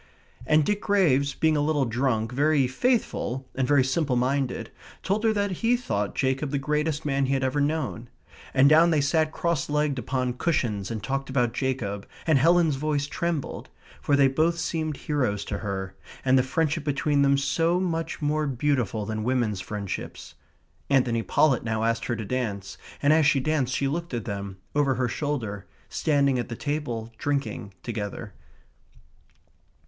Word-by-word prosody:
And 150 +1 +4
Dick 210 0 0
Graves, 140 -10 +2
being 160 -1 +2
a 145 - +1
little 145 -2 +1
drunk, 115 -1 0
very 145 +1 +3
faithful, 130 - -1
and 130 -1 -1
very 140 -1 +4
simple 135 0 0
minded, 130 +2 -1 0.3
told 205 +3 0
her 225 - +4
that 205 -1 0
he 240 +1 +3
thought 105 - -2
Jacob 135 +2 0
the 140 - -1
greatest 150 +2 -1
man 135 -2 +1
he 135 - +1
had 135 - -1
ever 130 +3 +1
known. 140 -6 -2 0.4
And 135 +1 +5
down 160 +3 +6
they 155 -3 +3
sat 155 +2 +2
cross 170 -5 -1
legged 150 -2 0
upon 125 +1 -1
cushions 110 - 0
and 110 -3 -4
talked 135 +4 -2
about 125 -3 +1
Jacob, 110 -7 -2 0.2
and 155 -4 +4
Helen's 165 -1 +4
voice 145 0 0
trembled, 165 0 -3 0.3
for 145 - +2
they 140 -1 +5
both 160 +5 +1
seemed 160 -2 -2
heroes 125 -9 -1
to 100 - -4
her, 95 -2 -4 0.3
and 130 0 +4
the 130 - +6
friendship 155 +4 0
between 145 0 +1
them 140 0 +4
so 165 +6 +1
much 165 -4 -2
more 150 +1 +1
beautiful 125 -5 0
than 110 0 -3
women's 115 -5 0
friendships. 100 -1 -6 0.6
Anthony 125 -4 +2
Pollett 135 +2 +2
now 110 -1 -1
asked 115 0 0
her 120 - -1
to 110 -1 -5
dance, 100 -5 -3 0.3
and 145 +2 +5
as 155 -2 +4
she 145 - +4
danced 135 -2 0
she 140 - 0
looked 165 0 -3
at 115 - -4
them, 100 -2 -5 0.2
over 145 -2 +2
her 125 -1 0
shoulder, 120 -9 -3 0.2
standing 140 -4 +2
at 120 - -4
the 115 - -4
table, 120 -6 -3
drinking 115 -9 -2
together. 105 -2 -5
135 Hz, 170 wpm, -26 LUFS, 120-155 Hz, 0.6 s, down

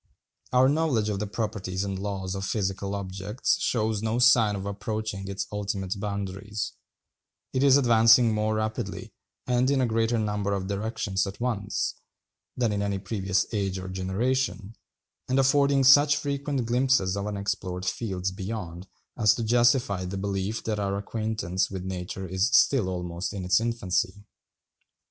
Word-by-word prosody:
Our 125 +1 +5
knowledge 140 -7 +1
of 100 -2 -2
the 105 - -2
properties 100 -3 -3
and 100 -1 -3
laws 95 -2 -3
of 95 0 -4
physical 100 0 -2
objects 100 +3 -2
shows 110 -3 0
no 110 +1 -1
sign 120 -4 +5
of 100 0 -5
approaching 100 -1 -4
its 100 0 -3
ultimate 100 -1 -3
boundaries: 100 +1 -4 0.8
it 130 - +1
is 140 -1 +6
advancing 115 -2 +5
more 110 0 0
rapidly, 110 0 -3 0.3
and 125 +1 +2
in 140 -1 +2
a 130 - +3
greater 115 0 +1
number 105 -2 -1
of 95 -1 -2
directions 100 -1 -2
at 95 - -7
once, 115 -4 -1 0.6
than 120 -3 +1
in 100 -1 -1
any 100 -1 -1
previous 95 -2 -1
age 100 -3 -1
or 95 0 -6
generation, 100 +2 -1 0.6
and 130 - +2
affording 140 0 +4
such 145 +2 +7
frequent 140 -3 -2
glimpses 120 -5 +2
of 100 +1 -3
unexplored 95 -3 -3
fields 95 -1 -2
beyond 95 -2 -6 0.3
as 105 -2 +5
to 115 - -3
justify 120 -4 +2
the 90 +2 -4
belief 100 +2 -2
that 110 -2 -2
our 100 -1 -1
acquaintance 110 -3 -2
with 95 -1 -6
nature 95 0 -5
is 95 +3 +1
still 125 -7 +4
almost 90 0 -4
in 95 -3 -5
its 90 - +4
infancy. 100 -4 -1
105 Hz, 155 wpm, -26 LUFS, 95-115 Hz, 0.8 s, such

